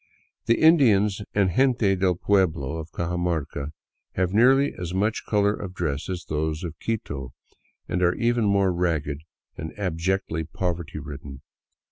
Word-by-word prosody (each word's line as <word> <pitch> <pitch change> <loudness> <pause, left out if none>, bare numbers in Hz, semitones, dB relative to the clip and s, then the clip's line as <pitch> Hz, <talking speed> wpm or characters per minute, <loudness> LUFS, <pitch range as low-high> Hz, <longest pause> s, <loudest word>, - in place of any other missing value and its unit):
The 115 - +3
Indians 110 -12 +5
and 100 -3 +3
gente 125 -7 +3
del 90 -1 +1
pueblo 80 -6 +1
of 80 0 -6
Cajamarca 85 -4 -2 0.4
have 95 0 0
nearly 135 +6 +5
as 90 0 -5
much 105 +4 0
color 105 -1 +3
of 95 -3 -7
dress 75 -4 -2
as 90 -2 -4
those 75 +2 -2
of 80 -2 -6
Quito, 70 - -4 0.5
and 90 - -1
are 90 0 +3
even 120 -1 +1
more 100 -2 +3
ragged 80 -5 -1 0.4
and 80 +1 -7
ab 90 -5 -2
jectly 85 -3 -1
poverty 85 -3 -3
ridden. 70 -2 -8
90 Hz, 145 wpm, -25 LUFS, 80-100 Hz, 0.5 s, Indians